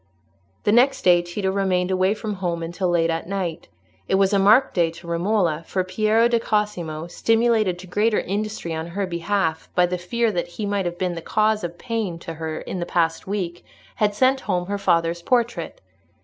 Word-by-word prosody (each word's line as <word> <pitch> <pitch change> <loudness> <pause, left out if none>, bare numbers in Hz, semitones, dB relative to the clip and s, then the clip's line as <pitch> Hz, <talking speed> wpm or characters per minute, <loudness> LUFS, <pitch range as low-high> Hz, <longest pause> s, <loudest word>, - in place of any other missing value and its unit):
The - - +3
next 250 +5 +4
day 175 -1 +5
Tito 190 +3 -2
remained 190 -2 0
away 185 +2 +2
from 215 -1 -4
home 170 -2 -1
until 175 +2 -2
late 165 -1 +2
at 165 +2 -4
night. 180 -4 -3 0.4
It - - +2
was 195 +1 +3
a 200 - +4
marked 215 +7 +5
day 170 -3 +2
to 170 +2 -12
Romola, 170 -1 0
for 185 - 0
Piero 215 +5 +2
di 235 -1 +2
Cosimo, 180 -8 -2
stimulated 225 0 +2
to 180 - -10
greater 210 +4 +1
industry 205 -3 -3
on 160 +1 -4
her 195 +3 -2
behalf 170 -2 -1
by 180 - +5
the 180 0 -3
fear 230 +5 0
that 175 -3 -2
he 215 - -2
might 200 -2 -1
have 175 0 -5
been 180 -1 -1
the 165 - -6
cause 215 +4 +1
of 175 0 -5
pain 225 -7 -3
to 165 0 -7
her 160 0 -5
in 185 - -5
the 175 - -3
past 165 0 0
week, 180 -4 -3 0.3
had 205 -1 +1
sent 260 +4 +3
home 180 -7 -1
her 200 +2 -3
father's 170 -1 +1
portrait. 240 - -1
185 Hz, 200 wpm, -23 LUFS, 170-210 Hz, 0.4 s, day